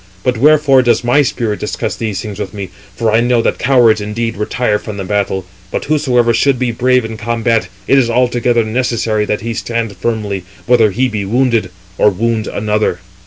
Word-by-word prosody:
But 125 Hz, -, +1 dB
wherefore 145 Hz, -1 st, +5 dB
does 120 Hz, -1 st, +2 dB
my 125 Hz, +5 st, +3 dB
spirit 115 Hz, -6 st, -2 dB
discuss -, -, -3 dB
these 105 Hz, -4 st, -3 dB
things 105 Hz, -2 st, -7 dB
with 105 Hz, -, -5 dB
me? 95 Hz, -3 st, -6 dB, 0.2 s
for 115 Hz, -2 st, 0 dB
I 110 Hz, -, +4 dB
know 120 Hz, 0 st, +2 dB
that -, -, 0 dB
cowards 120 Hz, -5 st, +4 dB
indeed 115 Hz, +2 st, -3 dB
retire 105 Hz, +1 st, -1 dB
from 105 Hz, -2 st, -7 dB
the 100 Hz, -, -4 dB
battle; 95 Hz, -1 st, -1 dB, 0.2 s
but -, -, -3 dB
whosoever 125 Hz, -6 st, +2 dB
should 135 Hz, +3 st, +2 dB
be 125 Hz, -1 st, -1 dB
brave 125 Hz, +1 st, +2 dB
in 110 Hz, 0 st, -6 dB
combat, 115 Hz, -2 st, 0 dB, 0.2 s
it 135 Hz, -, +5 dB
is 120 Hz, -3 st, +1 dB
altogether 120 Hz, -1 st, +1 dB
necessary 110 Hz, -2 st, -1 dB
that 105 Hz, -, -2 dB
he 115 Hz, +2 st, -3 dB
stand 115 Hz, -2 st, -3 dB
firmly, 105 Hz, -5 st, -3 dB, 0.2 s
whether 120 Hz, -3 st, +4 dB
he 125 Hz, +7 st, 0 dB
be 105 Hz, -4 st, -3 dB
wounded, 115 Hz, -1 st, +1 dB, 0.3 s
or -, -, +5 dB
wound 110 Hz, +2 st, -1 dB
another." 105 Hz, -3 st, -1 dB
115 Hz, 190 wpm, -15 LUFS, 105-125 Hz, 0.3 s, wherefore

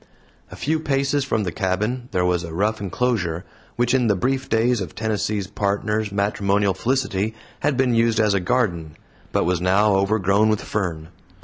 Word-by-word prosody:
A -, -, -10 dB
few 155 Hz, +4 st, -1 dB
paces 140 Hz, -1 st, 0 dB
from 110 Hz, -5 st, 0 dB
the 90 Hz, -, -2 dB
cabin 105 Hz, +8 st, -2 dB
there 90 Hz, -1 st, +1 dB
was 90 Hz, -1 st, +1 dB
a 85 Hz, -, -7 dB
rough 105 Hz, +3 st, 0 dB
enclosure, 95 Hz, -5 st, -1 dB, 0.3 s
which 120 Hz, +1 st, +1 dB
in 125 Hz, -3 st, +3 dB
the 105 Hz, -, +3 dB
brief 130 Hz, +7 st, -1 dB
days 115 Hz, 0 st, +2 dB
of 90 Hz, -5 st, -6 dB
Tennessee's 105 Hz, -2 st, -1 dB
Partner's 105 Hz, +1 st, -1 dB
matrimonial 100 Hz, 0 st, +1 dB
felicity 110 Hz, -1 st, -1 dB, 0.2 s
had 145 Hz, -2 st, 0 dB
been 130 Hz, -2 st, +2 dB
used 115 Hz, 0 st, +2 dB
as 105 Hz, -2 st, +3 dB
a 100 Hz, -, +2 dB
garden, 90 Hz, -7 st, -1 dB, 0.3 s
but -, -, +1 dB
was 90 Hz, 0 st, 0 dB
now 100 Hz, +3 st, +3 dB
overgrown 100 Hz, +1 st, +2 dB
with 110 Hz, -1 st, +1 dB
fern. 85 Hz, -6 st, -3 dB
105 Hz, 175 wpm, -22 LUFS, 95-120 Hz, 0.3 s, in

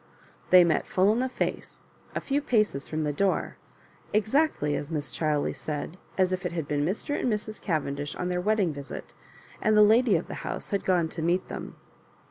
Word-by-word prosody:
They 180 Hz, -1 st, +9 dB
met 165 Hz, -3 st, +1 dB
full 190 Hz, +3 st, +3 dB
in 230 Hz, -, 0 dB
the 260 Hz, +1 st, 0 dB
face, -, -, -4 dB, 0.3 s
a -, -, +1 dB
few 285 Hz, +1 st, -1 dB
paces 215 Hz, -, +1 dB
fK>m 155 Hz, 0 st, -1 dB
the 150 Hz, -1 st, -1 dB
door— 190 Hz, +6 st, 0 dB, 0.6 s
exactly, 215 Hz, -, +2 dB
as 145 Hz, +1 st, -4 dB
Mrs. 150 Hz, -3 st, -3 dB
Chiley 150 Hz, -2 st, 0 dB
said, 155 Hz, +2 st, -5 dB, 0.2 s
as 185 Hz, -1 st, +3 dB
if 180 Hz, -, -3 dB
it -, -, -3 dB
had 165 Hz, -4 st, -3 dB
been 145 Hz, -1 st, 0 dB
Mr. 205 Hz, -, -1 dB
and 245 Hz, -, 0 dB
Mrs. 215 Hz, 0 st, -3 dB
Cavendish 145 Hz, -4 st, -2 dB
on 180 Hz, -, -3 dB
their 180 Hz, 0 st, 0 dB
wedding 200 Hz, -4 st, +1 dB
visit, 140 Hz, -1 st, -8 dB, 0.5 s
and 215 Hz, 0 st, +3 dB
the 210 Hz, -, +8 dB
lady 220 Hz, 0 st, +5 dB
of 165 Hz, -, 0 dB
the -, -, -6 dB
house -, -, -5 dB
had 200 Hz, -, -1 dB
gone 175 Hz, -3 st, +3 dB
to 165 Hz, -, -5 dB
meet 175 Hz, +3 st, 0 dB
them. -, -, -6 dB
180 Hz, 200 wpm, -27 LUFS, 155-215 Hz, 0.6 s, They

